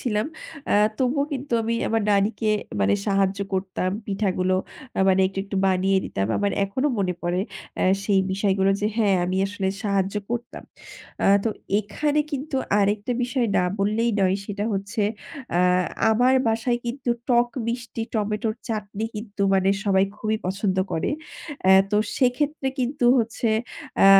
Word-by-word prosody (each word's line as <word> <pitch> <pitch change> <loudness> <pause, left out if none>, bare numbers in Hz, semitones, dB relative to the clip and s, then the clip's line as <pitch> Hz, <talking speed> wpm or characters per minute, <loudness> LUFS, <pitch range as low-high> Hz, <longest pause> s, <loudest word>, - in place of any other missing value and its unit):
ছিলাম, 215 -3 0 0.4
অ্যা - - +3 0.2
তবুও 270 +2 +1
কিন্তু 275 -1 -5
আমি 230 +1 -1
আমার 225 -1 +1
নানিকে 210 +2 +2 0.3
মানে 100 +1 +3
সাহায্য 195 0 +1
করতাম, 185 -1 -1 0.2
পিঠাগুলো 190 -2 0 0.4
আ - - +3
মানে 190 0 +4
একটু 195 +1 -6
একটু 195 0 -5
বানিয়ে 190 +1 +2
দিতাম। 95 - -2
আমার 205 -1 0
এখনও 260 +9 0
মনে 180 -2 0
পড়ে, 175 +2 0 0.4
আ - - +2 0.2
সেই 195 -2 +3
বিষয়গুলো 195 0 +2
যে, 210 - +1
হ্যাঁ 210 -4 +3
আমি 185 +1 -1
আসলে 195 -1 -2
সাহায্য 200 -2 0 0.2
করতাম। 240 0 -4 0.6
আ - - +4 0.2
তো 230 - +2 0.3
এখানে 290 +9 0
কিন্তু 275 0 -3 0.2
আরেকটা 205 +4 +1
বিষয় 245 0 0
না 180 - +3
বললেই 215 +4 +1
নয়, 190 0 +3
সেটা 205 +1 -3
হচ্ছে 205 +3 -2 0.6
আ - - +4 0.5
আমার 250 +4 +4
বাসায় 235 +2 +1
কিন্তু 245 0 -2 0.2
টক-মিষ্টি 235 -1 0
টমেটোর 215 +1 -1
চাটনি 215 -1 -3
কিন্তু 210 -2 -5
মানে 190 0 +3 0.2
সবাই 195 -1 +4
খুবই 215 0 -1
পছন্দ 190 0 -1 0.2
করে। 160 - 0 0.5
অ্যা 190 0 +7 0.2
তো 210 - +2 0.2
সেক্ষেত্রে 270 +2 +1
কিন্তু 250 +1 -1
হচ্ছে 230 0 -1 0.6
আ - - +9
210 Hz, 150 wpm, -24 LUFS, 195-240 Hz, 0.6 s, আ